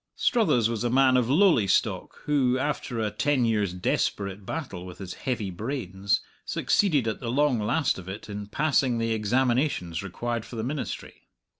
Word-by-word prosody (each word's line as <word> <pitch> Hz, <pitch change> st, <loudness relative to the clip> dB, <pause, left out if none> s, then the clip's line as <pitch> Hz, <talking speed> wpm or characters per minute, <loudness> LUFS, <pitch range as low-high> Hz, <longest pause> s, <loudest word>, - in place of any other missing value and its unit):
Struthers 210 Hz, -, +3 dB
was 115 Hz, -1 st, -2 dB
a 120 Hz, -, +1 dB
man 130 Hz, +1 st, +4 dB
of 125 Hz, -2 st, +2 dB
lowly 155 Hz, -, +4 dB
stock 90 Hz, -, 0 dB
who, 135 Hz, -4 st, +2 dB
after 130 Hz, -3 st, -2 dB
a 110 Hz, -2 st, 0 dB
ten 135 Hz, +3 st, +1 dB
years' 105 Hz, -4 st, +1 dB
desperate 95 Hz, +2 st, -2 dB
battle 125 Hz, -, -5 dB
with 90 Hz, -1 st, -9 dB
his 95 Hz, -2 st, -7 dB
heavy 115 Hz, -7 st, -3 dB
brains, 100 Hz, -2 st, -1 dB, 0.2 s
succeeded 150 Hz, -, +1 dB
at 110 Hz, -, -2 dB
the 120 Hz, -, -4 dB
long 135 Hz, -1 st, +2 dB
last 130 Hz, +4 st, +1 dB
of 95 Hz, 0 st, -9 dB
it 100 Hz, +3 st, -7 dB
in 105 Hz, -1 st, -6 dB
passing 135 Hz, -2 st, +1 dB
the 115 Hz, 0 st, 0 dB
examinations 120 Hz, -, 0 dB
required 115 Hz, +4 st, -3 dB
for 120 Hz, -, -10 dB
the 110 Hz, -, -3 dB
ministry. 140 Hz, +4 st, -5 dB
115 Hz, 170 wpm, -26 LUFS, 100-135 Hz, 0.2 s, man